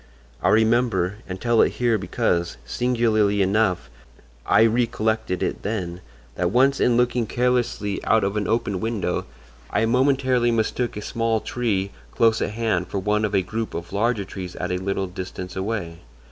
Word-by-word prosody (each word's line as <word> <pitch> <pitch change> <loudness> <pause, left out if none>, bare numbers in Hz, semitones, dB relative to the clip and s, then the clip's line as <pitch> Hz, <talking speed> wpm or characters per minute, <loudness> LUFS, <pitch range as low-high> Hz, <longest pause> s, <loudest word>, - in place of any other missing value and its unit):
I - - +2
remember—and 110 -4 +1
tell 120 +1 +3
it - - +2
here 120 -3 +1
because, 90 -3 -1
singularly 110 - +1
enough, 100 -1 +1 0.6
I - - +5
recollected 110 -4 0
it - - -2
then—that 85 - -4
once 135 +6 +3
in 120 -1 +3
looking 120 -1 +1
carelessly 120 -4 0
out 110 - +3
of 100 +1 -1
an 105 -2 -1
open 105 -4 0
window 110 -1 -2 0.4
I 110 - +1
momentarily 130 0 +2
mistook 115 +1 -1
a 105 - -5
small 115 0 0
tree 105 -5 -1 0.2
close 115 -1 +3
at - - 0
hand 105 -5 -1
for - - -4
one 105 +2 0
of 105 -1 0
a 95 - +3
group 110 +4 -4
of 85 +2 -6
larger 110 0 0
trees 90 -2 -7
at 90 - -3
a 90 - 0
little 95 +1 -1
distance 90 0 -7
away. 95 -4 -3
110 Hz, 160 wpm, -23 LUFS, 95-115 Hz, 0.6 s, I